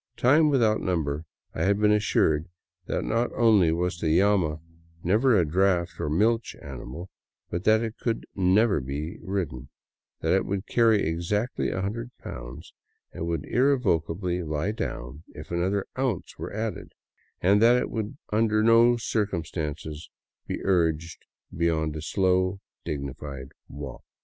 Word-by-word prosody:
Times 150 +5 +5
without 115 -6 +3
number 80 -4 -1 0.3
I - - -4
had 100 +1 +3
been 105 0 +4
assured 90 -6 +2 0.4
that - - -1
not 115 +2 0
only 105 -8 +4
was 90 +1 -1
the 80 +1 +3
llama 95 -6 +2 0.4
never 110 +6 +4
a 90 - +3
draft 90 +1 +1
or - - -2
a - - -1
milch 115 +9 +1
animal, 70 +6 -8 0.4
but 85 +3 -3
that 110 +1 +4
it 115 0 -5
could 115 -2 -2
never 95 +1 +3
be 75 +8 -5
ridden; 85 -10 -4 0.5
that - - +2
it - - +1
would 100 +1 -2
carry 115 -3 +3
exactly 85 +9 -1
a 95 - -2
hundred 115 +4 -3
pounds - - -9 0.4
and 85 - -4
would 85 -4 -2
irrevocably 90 - +1
lie 80 +4 -2
down 70 - -5
if - - -10
another 95 +3 0
ounce 130 -7 -2
were - - -6
added, 110 +1 -4 0.5
and 100 +3 +4
that 120 +2 +6
it - - -3
could 110 +4 -4 0.2
under 110 0 +3
no 115 +2 +6
circumstances 80 -8 -3 0.4
be - - -4
urged 85 -3 0 0.3
beyond 80 -2 0
a 80 - -4
slow, 95 +2 +1 0.3
dignified 70 -2 -5 0.2
walk. 70 -2 -8
95 Hz, 145 wpm, -26 LUFS, 80-110 Hz, 0.5 s, that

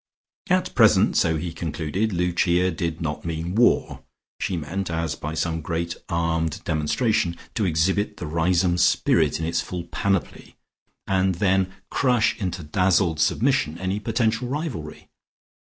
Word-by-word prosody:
At - - +1
present, - - +5
so 80 -1 +2
he 85 +1 -4
concluded, 85 +6 -2
Lucia 90 0 +1
did 85 0 -3
not 75 -2 -3
mean 85 +1 -3
war. 120 +4 +2 0.4
She 90 - -2
meant, 90 +5 -4
as 80 -2 -1
by 75 +1 -5
some 80 0 -1
great 85 +2 -3
armed 80 -2 -1
demonstration, 85 - 0 0.2
to 105 - 0
exhibit 95 +5 0
the - - -5
Riseholme 85 +3 +1
spirit - - +3
in 80 - -2
its 85 +1 0
full 90 -1 -5
panoply, 95 +2 -2 0.5
and 95 -1 +1
then 95 0 +1 0.2
crush 125 -4 +2
into 90 -3 -3
dazzled 85 0 +2
submission 115 - +1
any 95 +3 -2
potential 115 +2 0
rivalry. 130 - -5
85 Hz, 140 wpm, -24 LUFS, 80-95 Hz, 0.5 s, present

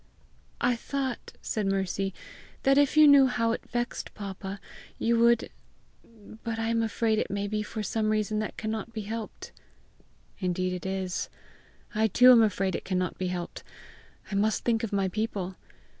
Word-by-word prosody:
"I 245 0 +2
thought," 265 0 -4
said 210 -3 -1
Mercy, 195 0 0 0.5
"that 275 +1 +5
if 285 +1 +2
you 305 -1 +9
knew 280 -2 +8
how 230 -2 +1
it - - -2
vexed 240 0 -3
papa, 195 -1 -6 0.4
you 230 0 +2
would 235 0 +4 0.9
But 230 -1 -3
I 225 0 -1
am 230 0 +2
afraid 220 0 +1
it - - -2
may 200 +1 -2
be 210 +1 -1
for 215 +1 -5
some 215 +2 0
reason 215 0 0
that 215 - -4
cannot 220 +1 -4
be 220 - -3
helped!" 220 +1 -6 0.9
"Indeed 185 0 -1
it 180 +1 -5
is; 190 -1 -2 0.6
I 220 0 +3
too 250 +5 +7
am 240 -2 +8
afraid 195 -3 +1
it - - -4
cannot 185 -2 -2
be 185 - -1
helped! 180 -1 -4 0.7
I - - -4
must 210 +2 +1
think 230 -2 +1
of 225 - -2
my 195 -1 +1
people! 195 -2 -3
215 Hz, 170 wpm, -28 LUFS, 195-230 Hz, 0.9 s, you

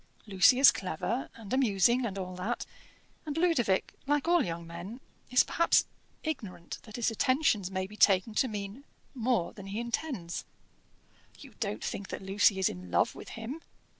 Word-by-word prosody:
Lucy 205 +5 +5
is 275 +1 +9
clever, 195 +7 -3
and 220 -2 -8
amusing, 240 -1 +3
and 195 -2 -6
all 185 -1 -4
that; 200 +7 -3 0.6
and 300 0 -4
Ludovic, 285 - +2
like 290 +1 +1
all 345 -3 +4
young 170 -4 -4
men, 170 +8 -8 0.3
is 250 - +5
perhaps 335 - +3 0.4
ignorant 210 - -5
that 215 -2 -11
his 240 -1 0
attentions 255 - +2
may 190 -1 -2
be 210 +2 -11
taken 195 +2 +4
to 260 - +2
mean 205 +3 -6 0.3
more 240 -7 0
than 200 -2 -10
he 200 +3 -4
intends 235 - -3 0.5
" - - -30
"You - - -12
don't 105 - -3
think 195 - -4
that - - -6
Lucy 195 +1 +3
is 190 - +2
in 90 0 -6
love 85 - +2
with - - -10
him?" 245 +8 -6
215 Hz, 170 wpm, -30 LUFS, 190-255 Hz, 0.6 s, is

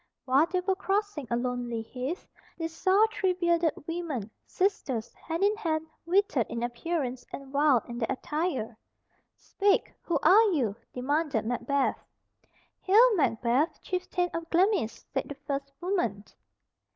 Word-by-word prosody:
While 275 +5 +4
they 365 +1 0
were 385 +1 +1
crossing 390 - -1
a 235 - +1
lonely 245 -2 -2
heath, 260 - -5 0.3
they 330 -1 -2
saw 380 +6 +3
three 375 -2 +1
bearded 340 -3 +2
women, 315 - -4 0.2
sisters, 315 - -1
hand 330 +3 -4
in 410 +1 +4
hand, 320 -6 -1 0.2
withered 350 - +2
in 235 - -3
appearance 255 +1 -2
and 275 0 -8
wild 280 -5 +4
in 240 0 -6
their 225 - 0
attire. 275 -5 -2 0.6
"Speak, 400 0 +1
who 335 - 0
are 435 +4 +7
you?" 235 -10 0 0.2
demanded 275 -2 0
Macbeth. 270 +4 0 0.8
"Hail, 450 +5 +6
Macbeth, 250 - +1
chieftain 360 -1 -1
of 330 0 -4
Glamis," 360 - +1
said 270 - -2
the 285 - -5
first 275 0 -4
woman. 290 - -1
310 Hz, 140 wpm, -28 LUFS, 250-365 Hz, 0.8 s, are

